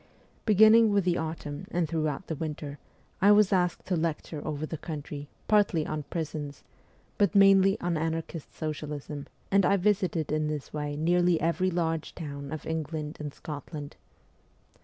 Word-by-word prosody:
Beginning 220 +1 +7
with 200 -1 +3
the 175 -1 +1
autumn 160 +1 -5
and 175 -5 0
throughout 155 +1 -2
the - - -3
winter, 150 -2 -5 0.4
I 200 +2 +7
was 205 -1 +5
asked 180 -2 +1
to 185 - 0
lecture 160 -2 -2
over 155 0 -3
the 155 -1 -6
country, 145 -2 -6 0.2
partly 200 -7 +3
on 155 0 -3
prisons, 150 -1 -5 0.6
but 205 +1 +3
mainly 195 0 +6
on 175 -1 0
anarchist 165 0 -3
socialism, 150 -2 -5 0.2
and 195 0 +5
I 200 +2 +4
visited 185 -6 +1
in 155 0 +1
this 150 -2 -4
way 150 -1 -3
nearly 175 +2 +3
every 170 +3 +1
large 165 -3 -2
town 140 -3 -6
of 155 -2 -5
England 155 -1 -3
and 150 -1 -4
Scotland. 145 -1 -7
160 Hz, 155 wpm, -28 LUFS, 150-180 Hz, 0.6 s, Beginning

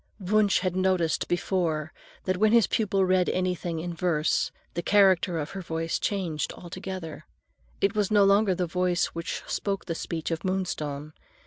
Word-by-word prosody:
Wunsch 205 +1 +2
had 185 -1 -1
noticed 185 -3 +1
before 165 -3 -1 0.3
that 185 -1 0
when 215 +3 +3
his 235 -2 +6
pupil 195 -3 +1
read 185 -1 +2
anything 180 -2 -1
in 175 +1 -4
verse 165 -2 +1 0.2
the 170 - -2
character 190 -3 +4
of 150 -2 -3
her 195 - -5
voice 165 -1 -2
changed 175 -7 -2
altogether; 175 -3 -7 0.5
it 195 +1 +2
was 210 -3 +1
no 210 -2 +5
longer 200 -1 +4
the 180 - 0
voice 180 +1 +1
which 170 0 -4
spoke 200 -1 -2
the 170 - -2
speech 165 0 -4
of 165 0 -3
Moonstone. 155 -6 -3
180 Hz, 160 wpm, -27 LUFS, 165-195 Hz, 0.5 s, his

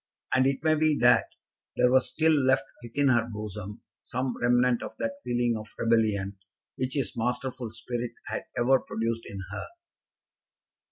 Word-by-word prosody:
And 130 0 +4
it 135 +2 -1
may 155 -1 +4
be 155 -1 +3
that 120 0 +5 0.5
there 125 - +4
was 130 0 +4
still 160 0 +2
left 130 -5 +3 0.2
within 140 +4 +1
her 120 -2 +2
bosom 105 -1 -7 0.2
some 130 0 -3
remnant 125 0 +3
of - - -7
that 280 0 -3
feeling 120 -1 +1
of 110 -1 -8
rebellion 105 -4 +1 0.4
which 130 +2 -3
his 140 -3 -1
masterful 125 +1 -2
spirit 120 +2 -4
had - - -4
ever 130 +2 +4
produced 115 0 -3
in 100 -1 -6
her. - - -4
120 Hz, 155 wpm, -28 LUFS, 115-130 Hz, 0.5 s, that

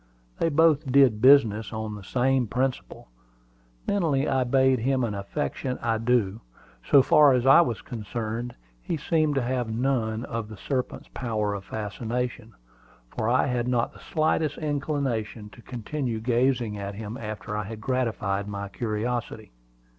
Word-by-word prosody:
They 165 - +2
both 155 -2 +3
did 125 -6 +5
business 115 -6 +5
on 110 -1 -4
the 105 -1 -9
same 130 +2 +1
principle. 125 - -3 0.8
Mentally 155 -8 +1
I 130 -1 +2
bade 130 0 +3
him 130 +2 +1
an 115 -3 -1
affectionate 125 +5 -3
adieu. 115 -2 +1 0.4
So 140 -2 +5
far 145 -1 +6
as 125 0 +1
I 135 +6 +8
was 120 -10 -2
concerned, 115 -1 -5 0.3
he 160 - -3
seemed 155 0 +1
to 135 - +1
have 125 -1 -1
none 115 -1 -1
of 115 -2 -5
the 110 - -9
serpent's 130 +4 -3
power 110 -5 -2
of 100 -1 -6
fascination, 115 +1 -4 0.6
for 110 - 0
I 125 - +3
had 125 -3 -1
not 120 -2 0
the - - -15
slightest 155 -1 0
inclination 135 -8 -2
to 120 - -15
continue 125 0 -4
gazing 120 -2 0
at 100 0 -5
him 110 +1 -6
after 105 -3 -6
I 105 -1 -2
had 110 +1 -7
gratified 110 -6 -1
my 100 -1 -5
curiosity. 110 0 -3
120 Hz, 150 wpm, -26 LUFS, 110-135 Hz, 0.8 s, I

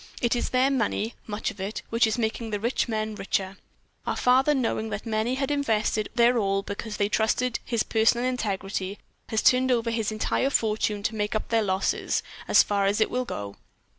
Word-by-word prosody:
It 240 0 +1
is 240 - -1
their 260 +2 +3
money, 230 -3 0
much 210 0 -2
of 200 - -10
it, 200 +3 -4
which 230 0 +4
is 220 - -1
making 225 0 -2
the 210 -1 -2
rich 235 +5 0
men 215 -1 -2
richer. 195 -1 -2 0.5
Our - - 0
father, 265 +4 +4
knowing 225 -3 -1
that 210 - -5
many 225 +2 0
had 270 +1 -1
invested 220 -6 0
their 240 0 +4
all 195 -1 0
because 210 +2 -5
they 205 - +2
trusted 225 +3 +1
his 235 -2 0
personal 225 +2 +2
integrity, 200 -5 -2 0.3
has 220 - 0
turned 255 +1 +4
over 230 -1 +1
his 225 -2 -1
entire 215 +5 0
fortune 215 -4 0
to 225 - 0
make 210 0 -2
up 215 - -2
their 230 -1 +3
losses, 190 -2 0 0.2
as - - +6
far 200 -1 +1
as 205 +2 +1
it 220 - +2
will 250 0 -1
go." 100 - -6
220 Hz, 195 wpm, -26 LUFS, 210-240 Hz, 0.5 s, as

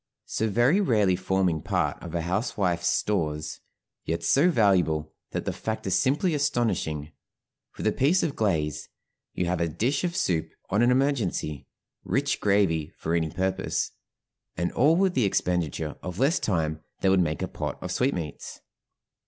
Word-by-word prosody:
So 110 - -1
very 120 - +3
rarely 105 - +3
forming 95 -3 0
part - - -1
of 85 -1 -7
a 85 - 0
housewife's 90 -2 0
stores, 75 -6 -1 0.4
yet 85 +1 -2
so 150 +7 +4
valuable 90 - +2 0.2
that - - -4
the - - -1
fact 110 0 -4
is 95 - 0
simply 150 +6 +2
astonishing; 100 - 0 0.7
with - - -5
a - - +4
piece 160 +8 +2
of 150 -4 -1
glaze, 80 -9 -1 0.5
you 90 - 0
have 85 0 -1
a 85 - +2
dish 125 - -1
of 175 -1 -1
soup 90 - 0 0.2
on 100 +3 +3
an 120 - +5
emergency, 125 - 0 0.4
rich 135 +8 0
gravy 95 -7 +2
for 80 - -2
any 80 -2 +1
purpose, 95 +2 -1 0.7
and 85 +1 0
all 150 +6 +4
with 190 0 +2
the 125 -8 +2
expenditure 85 -5 -1
of 90 -1 -6
less 140 - +3
time 80 -5 -1 0.2
than 95 - +3
would 95 - +4
make 75 -3 -1
a - - -1
pot - - -4
of 90 - -4
sweetmeats. 90 - -2
95 Hz, 160 wpm, -26 LUFS, 80-125 Hz, 0.7 s, an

